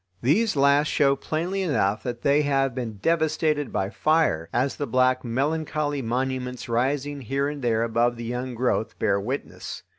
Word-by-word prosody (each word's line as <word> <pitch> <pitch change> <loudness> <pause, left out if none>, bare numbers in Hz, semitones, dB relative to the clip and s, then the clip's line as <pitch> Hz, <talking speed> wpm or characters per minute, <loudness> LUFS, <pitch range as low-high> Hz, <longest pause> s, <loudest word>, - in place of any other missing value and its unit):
These 205 - +2
last 140 +1 +4
show 140 -2 +3
plainly 175 +7 -2
enough 110 - +1
that 120 -1 -5
they 140 +1 +4
have 135 -3 +1
been 120 -3 -4
devastated 155 +1 +1
by 95 +1 -1
fire, 155 - +1
as 130 +3 0
the 145 - -3
black, 130 +1 +2
melancholy 145 +3 -1
monuments 125 +1 -2
rising 135 +4 -1
here 135 +3 -1
and 145 -1 -5
there 115 -2 +1
above 115 +1 +1
the 115 0 -7
young 125 +1 -4
growth 115 -2 -1
bear 100 -2 +1
witness. 130 +7 -5
135 Hz, 160 wpm, -25 LUFS, 120-145 Hz, -, last